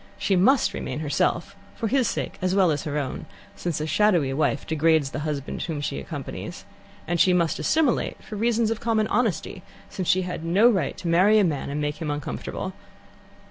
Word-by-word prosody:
She 195 Hz, -, +1 dB
must 245 Hz, +9 st, +4 dB
remain 150 Hz, -, -4 dB
herself, 170 Hz, +6 st, 0 dB, 0.2 s
for 225 Hz, -, -2 dB
his 255 Hz, +1 st, +2 dB
sake -, -, -3 dB
as 185 Hz, +1 st, +1 dB
well 190 Hz, -4 st, +4 dB
as 145 Hz, -2 st, -2 dB
her 150 Hz, -1 st, -2 dB
own, 135 Hz, -3 st, -4 dB, 0.3 s
since 170 Hz, -4 st, -3 dB
a 155 Hz, -, -2 dB
shadowy 160 Hz, -4 st, +2 dB
wife 140 Hz, 0 st, 0 dB
degrades 160 Hz, -2 st, +2 dB
the -, -, -4 dB
husband 145 Hz, -1 st, -4 dB
whom 160 Hz, -4 st, -3 dB
she 140 Hz, -, -3 dB
accompanies; 70 Hz, -, -7 dB, 0.4 s
and 175 Hz, 0 st, 0 dB
she 180 Hz, +3 st, +5 dB
must 170 Hz, -2 st, +1 dB
assimilate 305 Hz, -6 st, +1 dB
for 215 Hz, -, -8 dB
reasons 225 Hz, +1 st, +1 dB
of 225 Hz, -, -2 dB
common 225 Hz, -2 st, +1 dB
honesty, 200 Hz, -5 st, -1 dB, 0.3 s
since 185 Hz, -3 st, -4 dB
she 185 Hz, 0 st, +3 dB
had 180 Hz, -3 st, -5 dB
no 185 Hz, +8 st, +4 dB
right 195 Hz, -, -1 dB
to 175 Hz, -, -6 dB
marry 185 Hz, +6 st, +5 dB
a 210 Hz, -, +5 dB
man 150 Hz, -7 st, -1 dB
and 145 Hz, +1 st, -3 dB
make 150 Hz, 0 st, -2 dB
him 160 Hz, -3 st, -4 dB
uncomfortable. 145 Hz, -1 st, -4 dB
175 Hz, 195 wpm, -25 LUFS, 150-210 Hz, 0.4 s, she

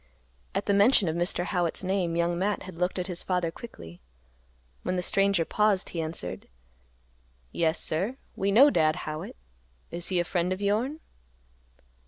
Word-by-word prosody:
At -, -, -1 dB
mention 200 Hz, 0 st, +4 dB
of 160 Hz, -, -2 dB
Mr. 175 Hz, +1 st, -1 dB
Howitt's 175 Hz, -2 st, -1 dB
name, 185 Hz, -3 st, 0 dB
Young 170 Hz, 0 st, +1 dB
Matt 200 Hz, +4 st, -1 dB
had 180 Hz, -3 st, -10 dB
looked 180 Hz, +1 st, 0 dB
at 180 Hz, -, -1 dB
his 180 Hz, -2 st, -2 dB
father 180 Hz, -3 st, 0 dB
quickly. 85 Hz, -, -11 dB, 0.8 s
When 185 Hz, -, -2 dB
the 180 Hz, -, -1 dB
stranger 195 Hz, -2 st, +2 dB
paused, 210 Hz, -1 st, +1 dB
he 165 Hz, -, -3 dB
answered, 155 Hz, -, -4 dB, 1.0 s
"Yes, 160 Hz, 0 st, +1 dB
sir. 195 Hz, +12 st, 0 dB, 0.2 s
We 200 Hz, +1 st, 0 dB
know 270 Hz, +8 st, +7 dB
Dad 155 Hz, -, +3 dB
Howitt. 155 Hz, 0 st, -5 dB, 0.6 s
Is 170 Hz, 0 st, -2 dB
he 185 Hz, -2 st, +1 dB
a -, -, +2 dB
friend 175 Hz, +1 st, -1 dB
of 185 Hz, -, -1 dB
yourn?" 225 Hz, +10 st, 0 dB
180 Hz, 160 wpm, -28 LUFS, 170-200 Hz, 1.0 s, know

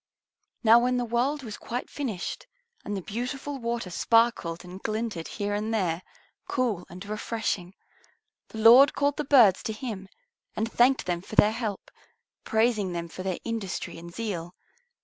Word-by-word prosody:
Now 230 Hz, +1 st, +8 dB
when 250 Hz, +1 st, +1 dB
the 245 Hz, -, 0 dB
world 255 Hz, +5 st, 0 dB
was 220 Hz, -4 st, -7 dB
quite 245 Hz, +2 st, -5 dB
finished 225 Hz, -11 st, -4 dB, 0.4 s
and 205 Hz, -1 st, -3 dB
the 190 Hz, -, -6 dB
beautiful 265 Hz, +7 st, -4 dB
water 235 Hz, -5 st, -3 dB
sparkled 210 Hz, -5 st, +2 dB
and 180 Hz, +2 st, -10 dB
glinted 215 Hz, -6 st, -3 dB
here 205 Hz, -1 st, -3 dB
and 210 Hz, +2 st, -2 dB
there, 180 Hz, -6 st, 0 dB, 0.5 s
cool 225 Hz, -8 st, -1 dB
and 185 Hz, +3 st, -9 dB
refreshing, 210 Hz, -3 st, -3 dB, 0.7 s
the -, -, -10 dB
Lord 235 Hz, +6 st, +8 dB
called 285 Hz, 0 st, +1 dB
the 300 Hz, -, -1 dB
birds 245 Hz, -10 st, +6 dB
to 220 Hz, -, -3 dB
Him 210 Hz, -4 st, -6 dB, 0.5 s
and 225 Hz, +1 st, -2 dB
thanked 255 Hz, +3 st, +3 dB
them 175 Hz, -1 st, -1 dB
for 205 Hz, -, -9 dB
their 210 Hz, -, +6 dB
help, 220 Hz, -3 st, -4 dB, 0.5 s
praising 220 Hz, -4 st, +1 dB
them 170 Hz, -1 st, -4 dB
for 185 Hz, -, -8 dB
their 185 Hz, -1 st, -2 dB
industry 220 Hz, -7 st, -4 dB
and 170 Hz, +1 st, -10 dB
zeal. 180 Hz, -5 st, -4 dB
220 Hz, 160 wpm, -27 LUFS, 185-240 Hz, 0.7 s, Now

